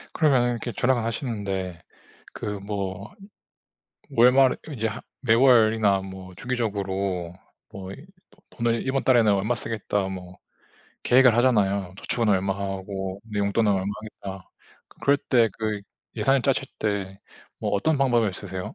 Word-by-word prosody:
그러면 135 -6 +3
이렇게 120 0 -4
절약을 120 0 +1
하시는데 100 - -3 0.5
그 105 -1 -4
뭐 100 -1 -5 1.0
월말에 125 +3 +5 0.2
이제 115 -5 -1
하 110 - -6 0.2
매월이나 110 -5 +4
뭐 95 -1 -9
주기적으로 100 -7 -2 0.4
뭐 95 -1 -8
이 135 +10 -11 0.2
도 - - -26
돈을 115 -1 -1
'이번 135 0 0
달에는 115 -5 +4
얼마 100 +5 0
쓰겠다.' 105 -4 -2
뭐 90 -1 -8 0.7
계획을 125 -2 +5
하잖아요. 100 -7 +2
'저축은 115 -3 -1
얼마하고 95 0 -2
내 105 -2 -5
용돈은 100 +2 +2
얼마 95 -1 0 0.5
하겠다.' 95 -2 -11 0.5
그럴 140 +1 +4
때 120 -4 +3
그 110 -2 -2 0.4
예산을 135 -1 +3
짜실 135 0 +1
때 100 -2 -2 0.4
뭐 - - -2
어떤 145 +10 +1
방법을 120 -6 +2
쓰세요? 95 -2 -6
105 Hz, 285 characters per minute, -25 LUFS, 95-120 Hz, 1.0 s, 월말에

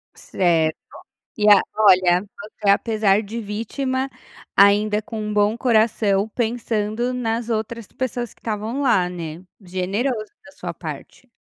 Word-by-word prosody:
Certo. 165 -4 +1 0.6
E 210 - +3
a 205 - +8
olha, 185 -4 +5 0.3
você 205 -2 -1
apesar 210 -1 +3
de 220 +3 -6
vítima, 260 +5 -3 0.5
ainda 210 +1 +4
com 220 0 -6
um 210 0 -3
bom 210 +1 +2
coração 220 -4 +2
pensando 230 0 -1
nas 235 -1 -2
outras 225 0 -3
pessoas 245 -2 -4
que - - -30
estavam 220 +5 -3
lá, 205 -9 +3
né, 170 -1 -7 0.2
generoso 200 +5 -2
da 285 - -15
sua - - -6
parte. 255 - -9
215 Hz, 130 wpm, -22 LUFS, 200-235 Hz, 0.6 s, a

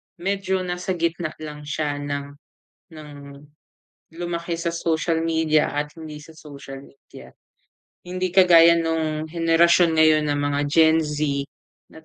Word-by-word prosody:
medyo 190 +1 -2
nasa 180 +1 -3
gitna 165 -1 -2
lang 150 -1 -9
siya 150 -1 -3
ng, 145 0 -4 0.7
ng 150 -1 -11 1.0
lumaki 170 0 -4
sa 170 0 -2
social 165 0 -1
media 160 -2 +1
at 150 +2 -4
hindi 155 -2 -9
sa 160 +1 -16
social 140 -3 -11
media. 135 0 -15 0.7
Hindi 185 +1 -3
kagaya 170 -2 +6
nung 160 -2 -2
henerasyon 170 +1 +3
ngayon 155 -1 +4
ng 145 0 -1
mga 145 0 -1
Gen 160 +1 +4
Z, 150 -2 -2 0.4
na 160 - -16
160 Hz, 130 wpm, -22 LUFS, 150-170 Hz, 1.0 s, kagaya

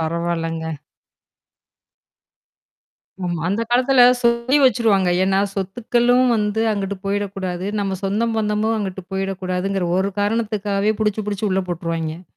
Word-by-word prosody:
பரவால்லங்க. 165 -1 -2 2.5
ம். 175 -1 -2
அந்த 210 +4 0
காலத்துல 255 +1 +5 0.2
சொல்லி 235 +3 +2
வச்சுருவாங்க. 210 -7 +3
ஏன்னா 195 0 +2
சொத்துக்களும் 240 +5 +1
வந்து 210 +1 0
அங்கிட்டு 200 -1 -3
போயிடக்கூடாது. 195 -2 -3
நம்ம 195 -2 -2
சொந்தம் 225 +4 0
பந்தமும் 215 +1 0
அங்கட்டு 190 -2 -5
போயிடக்கூடாதுங்கிற 190 -1 -2
ஒரு 195 +1 0
காரணத்துக்காகவே 210 -1 0
புடிச்சு 210 -1 0
புடிச்சு 205 +1 -2
உள்ள 190 0 +1
போட்டுருவாய்ங்க. 165 0 -3
200 Hz, 105 wpm, -20 LUFS, 185-220 Hz, 2.5 s, காலத்துல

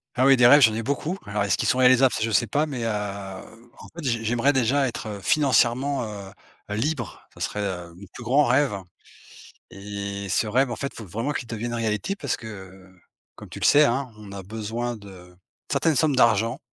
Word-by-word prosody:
Ah 130 +2 +3
oui, 135 -1 +6
des 120 - +5
rêves, 145 +4 +8
j'en 110 -4 +5
ai 115 - -3
beaucoup. 145 - -2
Alors, 105 0 -2
est-ce 100 -3 +1
qu'ils - - -1
sont 130 - +2
réalisables? 130 0 +5
Ça - - -3
je 115 - 0
sais 105 +1 +2
pas, 145 +8 0
mais, 130 -5 -4
heu, - - 0 0.9
en - - -11
fait, 170 - -7
j'ai 115 -4 -1
j'aimerais 120 +5 +2
déjà 135 +2 +2
être 110 -4 -6
financièrement, 135 -1 +2
heu, 100 -3 -7 0.4
heu, 105 - -3
libre. 130 +1 -3
Ce - - -16
serait, 105 - -3
heu, 90 -3 -5
mon 100 +3 -12
plus - - -9
grand 135 +5 +3
rêve 130 -3 +2 0.9
et 100 0 -6
ce 110 - +1
rêve, 125 +4 +1
en - - -2
fait, 140 - -3
il - - -19
faut 115 - -8
vraiment 115 - -3
qu'il 130 -4 -4
devienne 120 +1 -4
réalité 110 - -2
parce 140 -9 -3
que, 95 -5 -11 0.4
comme - - -12
tu - - -8
le - - -1
sais, 150 +1 +6
hein, 130 0 -1
on 105 -2 -11
a 100 0 -7
besoin 110 +4 -4
de 95 -3 -14 0.4
certaines 160 -2 +2
sommes 150 -1 +2
d'argent. 115 0 +3
115 Hz, 215 wpm, -24 LUFS, 105-135 Hz, 0.9 s, rêves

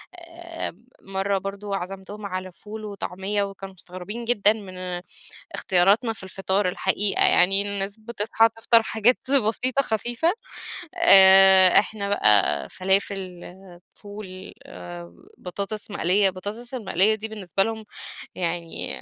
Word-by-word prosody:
آآ 335 - -8 0.3
مَرّة 195 +1 -2
برضو 200 +1 -6
عزمتهم 195 +2 -6
على 185 -1 -5
فول 215 +4 -10
وطعمية 200 0 -3
وكانوا 195 -1 -8
مستغربين 185 +6 -7
جدًا 215 -3 +3
من 185 -4 -7 0.5
اختياراتنا 200 +6 +2
في 200 - -9
الفطار 190 0 -1
الحقيقة 195 +2 +1
يعني، 195 +2 +5
الناس 200 0 -3
بتصحى 225 0 +1
تفطر 230 0 +4
حاجات 220 +3 +2 0.3
بسيطة 255 +5 0
خفيفة 240 - -1 0.6
آآ، 190 - +7
إحنا 205 -2 -4
بقى 105 - +2
فلافل، 190 -1 -2 0.6
فول، 205 -3 -10 0.8
بطاطس 200 +4 -5
مقلية، 195 +2 +2
البطاطس 205 +7 -8
المقلية 215 -3 +2
دي 220 +1 -5
بالنسبة 195 -3 -2
لهم 220 0 -5 0.5
يعني 170 -1 -3
200 Hz, 110 wpm, -23 LUFS, 190-220 Hz, 0.8 s, آآ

